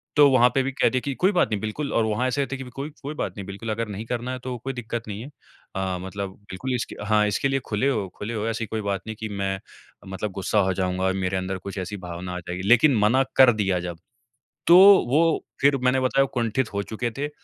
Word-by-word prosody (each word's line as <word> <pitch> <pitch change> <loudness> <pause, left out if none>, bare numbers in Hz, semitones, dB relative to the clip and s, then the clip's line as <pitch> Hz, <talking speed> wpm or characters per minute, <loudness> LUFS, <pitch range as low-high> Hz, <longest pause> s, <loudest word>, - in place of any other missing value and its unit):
तो 145 -1 +8
वहाँ 125 -1 +6
पे 135 - +4
भी 135 - -2
कह - - +2
दिया 130 -1 -1
कि 140 - -1
कोई 195 - +6
बात 175 - +3
नहीं 105 - 0
बिल्कुल 140 +7 -3
और 115 - +3
वहाँ 110 +4 0
ऐसे 140 +2 0
थे 135 - -4
कि 135 - -6
कोई, 135 +4 -6
कोई 145 +2 -4
बात - - -3
नहीं 100 - -6
बिल्कुल 100 +3 -6
अगर 115 +1 -2
नहीं 105 +3 -5
करना 125 +1 -3
है 130 - -4
तो 125 0 -5
कोई 135 0 -3
दिक्कत 120 -2 -5
नहीं 105 +2 -5
है। 135 - -8 0.5
अ, 95 -1 -1
मतलब 95 +1 -5 0.2
बिल्कुल 125 +7 -3
इसके 120 - -4
हाँ 105 0 +3
इसके 105 +6 0
लिए 135 0 +1
खुले 110 +6 0
हो 105 -8 -1
खुले 105 +3 -5
हो। 105 +1 -2
ऐसी 115 0 -2
कोई 110 -1 -3
बात 100 -2 -2
नहीं 110 - -4
कि 110 -1 -4
मैं 95 -1 -2 0.5
मतलब 100 +1 -3
गुस्सा 100 +2 0
हो 95 - +1
जाऊँगा 95 0 -1
और 95 - +2
मेरे 95 +1 0
अंदर 95 0 -3
कुछ 100 +1 -8
ऐसी 95 +3 -5
भावना 90 +1 -6
आ - - -4
जाएगी। 90 +1 -6
लेकिन 125 +3 +6
मना 120 +6 +4
कर 130 -2 +8
दिया 95 -4 0
जब, 85 -1 -5 0.7
तो 175 +1 +9 0.3
वो 165 +4 +2 0.2
फिर 140 0 +4
मैंने 125 +1 +3
बताया 135 +1 +3
कुंठित 120 -1 -1
हो 100 - -1
चुके 115 +3 -3
थे 145 +1 -2
110 Hz, 250 wpm, -24 LUFS, 100-130 Hz, 0.7 s, तो